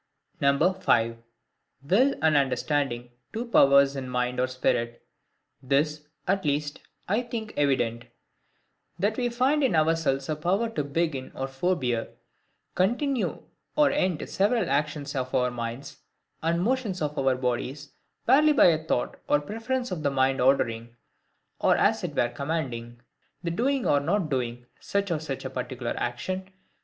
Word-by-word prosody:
5. 140 -2 +3 1.3
Will 255 - +4
and 160 -1 +4
Understanding 135 -3 0 0.2
two 230 +2 -3
Powers 140 - +5
in 130 -2 -5
Mind 125 0 -1
or 130 - +2
Spirit. 120 -2 -1 0.6
This, 150 +3 0 0.2
at 195 +1 +1
least, 145 0 -1 0.3
I 210 +6 +1
think 230 -3 -6
evident,—That 140 - -3
we 245 -1 0
find 260 +5 +2
in 250 -10 +2
ourselves 155 -4 +1
a 155 - -1
power 190 +9 0
to 150 -10 -2
begin 145 -2 -2
or 135 - -3
forbear, 135 -5 -1 0.7
continue 245 +7 0 0.3
or 300 -1 +4
end 185 - 0
several 210 - +1
actions 145 0 -1
of 130 -1 -2
our 125 -1 +2
minds, 120 +2 -6 0.4
and 170 +2 +1
motions 230 -5 0
of 150 0 -2
our 135 -1 +2
bodies, 130 +3 -3 0.3
barely 300 +5 +5
by 290 - +6
a 160 -1 +1
thought 140 -6 -1
or 145 - +4
preference 225 - -3
of 175 -4 -3
the 145 - +1
mind 135 -1 +1
ordering, 120 -3 +1 0.6
or - - +3
as - - +2
it - - -4
were 120 - +2
commanding, 120 -4 -4 0.4
the 170 - -1
doing 260 +8 0
or 145 - +4
not 170 +3 0
doing 120 -2 -2
such 200 -2 -1
or 160 - 0
such 145 -4 -5
a - - -2
particular 125 -1 -4
action. 185 +11 -3
145 Hz, 145 wpm, -27 LUFS, 130-195 Hz, 1.3 s, by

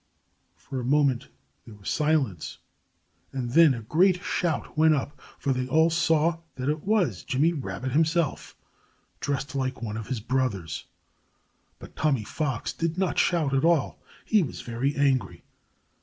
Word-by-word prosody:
For 135 -2 -6
a - - -4
moment 135 -1 +2 0.4
there 115 -3 -12
was 100 -2 -13
silence. 150 - 0 0.7
And 125 -3 -3
then 160 -1 +6
a 115 - -7
great 180 - +3
shout 165 -4 -2
went 155 0 +5
up. 145 0 -4 0.2
For 140 - 0
they 130 0 -2
all 160 +5 +4
saw 165 0 +2 0.2
that 130 +2 -2
it 150 +1 -1
was 180 - +1
Jimmy 150 +6 +2
Rabbit 130 -3 -4
himself, 160 +2 0 0.6
dressed 140 +1 -2
like 130 -2 -2
one 110 -1 -3
of 110 - -6
his 130 -4 -2
brothers. 110 - -2 0.9
But - - -13
Tommy 140 -7 +1
Fox 135 +2 -3
did 165 0 -2
not 190 -1 0
shout 160 -6 +2
at 135 - +2
all. 165 -4 +2 0.2
He 215 -2 +4
was 155 - -4
very 120 +4 -2
angry. 140 -2 +1
140 Hz, 155 wpm, -26 LUFS, 125-160 Hz, 0.9 s, then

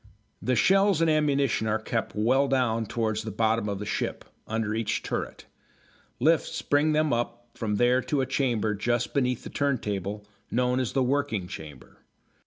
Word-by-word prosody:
The 125 - +1
shells 195 - +4
and 165 -1 +3
ammunition 140 -7 +1
are 110 0 +2
kept 110 0 -3
well 130 +6 +3
down 120 -4 +1
towards 110 -2 -1
the 110 - -5
bottom 110 0 +1
of 100 - -2
the 105 - -5
ship, - - -3 0.2
under 110 -1 -1
each 110 -1 -1
turret. - - -4 0.7
Lifts 160 +4 +2
bring 150 +2 +2
them 155 -2 +2
up 120 0 -3
from 105 -2 -2
there 120 +3 +3
to 140 +1 0
a - - 0
chamber 120 -5 0
just 120 +3 -1
beneath 125 -3 0
the - - -8
turntable, 105 -7 -2 0.2
known 125 +1 +1
as 125 -3 -2
the 135 - +2
working 130 -7 0
chamber. 75 -6 -10
120 Hz, 170 wpm, -27 LUFS, 110-140 Hz, 0.7 s, shells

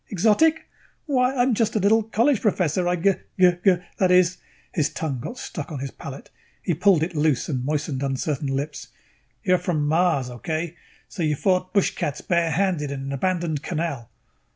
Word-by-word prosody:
Exotic? 220 - +3 0.4
Why, 260 -3 +1
I'm 250 0 +3
just 225 0 0
a - - +3
little 210 +3 +4
college 230 +4 +1
professor. 180 -4 +1
I 180 - +2
g 185 +3 +3 0.3
g 180 -1 +7
g, 190 -2 +6 0.2
that 185 - +3
is 180 0 +4 0.2
" - - -33
His 150 -4 +1
tongue 145 -6 -3
got 245 - -6
stuck 155 -11 -6
on 150 - -4
his 135 +1 -5
palate. 140 0 -10 0.3
He 175 - 0
pulled 175 0 +3
it 175 - -3
loose 150 -3 +1
and 130 -5 -2
moistened 145 -1 -2
uncertain 140 +1 -2
lips. 140 +2 -3 0.6
"You 185 - +3
are - - +5
from 165 -4 -1
Mars. 160 -4 +2
Okay? 160 +6 -4 0.3
So 185 - -7
you 155 -2 +1
fought 185 +3 +1
bushcats 185 -7 0
barehanded 170 -2 +1
in 140 -1 -4
an 135 0 -5
abandoned 170 0 -1
canal." 155 -8 -3
170 Hz, 180 wpm, -24 LUFS, 145-190 Hz, 0.6 s, g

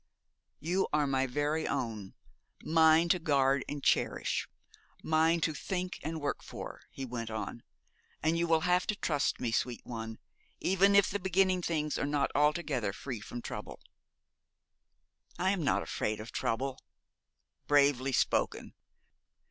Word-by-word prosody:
'You 180 +5 0
are 150 -1 +2
my 135 -1 +1
very 145 +4 -1
own 110 -5 -3 0.5
mine 160 +1 +5
to 180 - +3
guard 140 -3 +2
and 145 -1 -5
cherish, - - +1 0.5
mine 160 +1 +3
to 155 - +1
think 180 +4 -4
and 160 +1 -4
work 145 -1 -2
for,' - - -8
he 135 - -6
went 115 -2 -5
on, 110 +1 -5 0.6
'and 160 +1 +2
you 170 0 +1
will 165 -1 +3
have 180 +1 +2
to 215 - 0
trust 145 -7 0
me, 120 - -1
sweet 120 +1 -1
one, 110 -1 -6 0.4
even 195 +2 +3
if 200 -1 +5
the 205 - -1
beginning 185 0 +2
of 175 - -5
things 150 -3 -1
is - - 0
not 145 -1 0
altogether 150 - +1
free 125 +1 -5
from 120 +3 -7
trouble.' - - -6 1.6
'I 185 +2 +2
am 190 -5 -1
not - - +2
afraid 105 0 -2
of 110 +2 -8
trouble.' 130 +3 -2 0.9
'Bravely 140 -2 +3
spoken! 125 - 0
150 Hz, 150 wpm, -31 LUFS, 130-170 Hz, 1.6 s, mine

